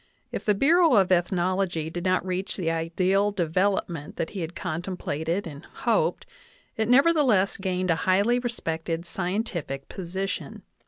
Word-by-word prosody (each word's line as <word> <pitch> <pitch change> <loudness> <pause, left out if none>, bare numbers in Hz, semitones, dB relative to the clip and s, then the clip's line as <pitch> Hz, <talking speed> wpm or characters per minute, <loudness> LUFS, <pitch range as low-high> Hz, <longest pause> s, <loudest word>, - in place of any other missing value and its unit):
If - - -5
the 210 - +3
Bureau 320 - +5
of 190 -3 +4
Ethnology 175 -2 +1
did 175 +1 -5
not 185 0 +2
reach 185 +1 -3
the 165 -4 0
ideal 185 +5 +1
development 175 -3 -1
that 160 - -3
he 195 - -5
had 165 +1 -5
contemplated 170 +1 -3
and 145 -3 -8
hoped, - - 0 0.5
it 220 0 -1
nevertheless 260 - +4
gained 185 -2 -1
a - - +3
highly 205 +6 +3
respected 165 -8 -3
scientific 175 - -3
position. 190 +2 -5
185 Hz, 140 wpm, -26 LUFS, 165-200 Hz, 0.5 s, Bureau